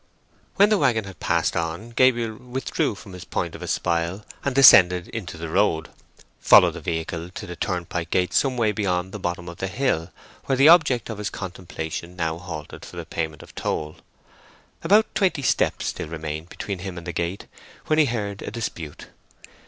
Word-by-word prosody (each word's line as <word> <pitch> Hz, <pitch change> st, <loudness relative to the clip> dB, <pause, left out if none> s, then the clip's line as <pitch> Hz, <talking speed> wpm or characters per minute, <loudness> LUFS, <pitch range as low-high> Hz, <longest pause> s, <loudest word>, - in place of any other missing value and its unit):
When 200 Hz, +1 st, +5 dB
the 215 Hz, -2 st, +3 dB
waggon 110 Hz, -3 st, +2 dB
had 95 Hz, -3 st, -11 dB
passed -, -, +1 dB
on, 85 Hz, +8 st, -3 dB
Gabriel 120 Hz, -2 st, +2 dB
withdrew 125 Hz, -2 st, -2 dB
from 100 Hz, -1 st, -12 dB
his 90 Hz, -, -8 dB
point -, -, -3 dB
of -, -, -9 dB
espial, 85 Hz, +4 st, -1 dB, 0.2 s
and 140 Hz, -2 st, -1 dB
descending 90 Hz, -10 st, +8 dB
into 95 Hz, -7 st, -5 dB
the 85 Hz, 0 st, -5 dB
road, 80 Hz, -2 st, +1 dB, 0.5 s
followed -, -, +7 dB
the -, -, -9 dB
vehicle 80 Hz, +1 st, -3 dB
to 90 Hz, -, -8 dB
the 90 Hz, -, -7 dB
turnpike 85 Hz, -2 st, -3 dB
gate 90 Hz, +1 st, +1 dB
some 130 Hz, -2 st, +2 dB
way 110 Hz, -3 st, +2 dB
beyond 95 Hz, -3 st, -1 dB
the 105 Hz, -, -6 dB
bottom 85 Hz, -1 st, -3 dB
of 85 Hz, -1 st, -8 dB
the 95 Hz, -, -2 dB
hill, 95 Hz, -7 st, -1 dB, 0.4 s
where 135 Hz, -, +1 dB
the 135 Hz, +4 st, +6 dB
object 145 Hz, -9 st, +5 dB
of 105 Hz, -, -6 dB
his 105 Hz, -2 st, -2 dB
contemplation 90 Hz, -2 st, -6 dB
now 80 Hz, -2 st, -2 dB
halted 80 Hz, -4 st, -8 dB
for -, -, -11 dB
the -, -, -5 dB
payment 80 Hz, -2 st, -4 dB
of -, -, -15 dB
toll. 75 Hz, 0 st, -3 dB, 0.9 s
About 215 Hz, +2 st, +5 dB
twenty 185 Hz, -8 st, +1 dB
steps -, -, +1 dB
still -, -, -3 dB
remained 80 Hz, +1 st, -5 dB
between 100 Hz, -3 st, -5 dB
him 90 Hz, -1 st, -6 dB
and 85 Hz, -, -8 dB
the 85 Hz, -, -4 dB
gate, 85 Hz, +4 st, -3 dB, 0.4 s
when 155 Hz, 0 st, +2 dB
he 155 Hz, -, +6 dB
heard 105 Hz, -5 st, -3 dB
a -, -, -5 dB
dispute. 85 Hz, -9 st, -6 dB
95 Hz, 185 wpm, -24 LUFS, 85-115 Hz, 0.9 s, descending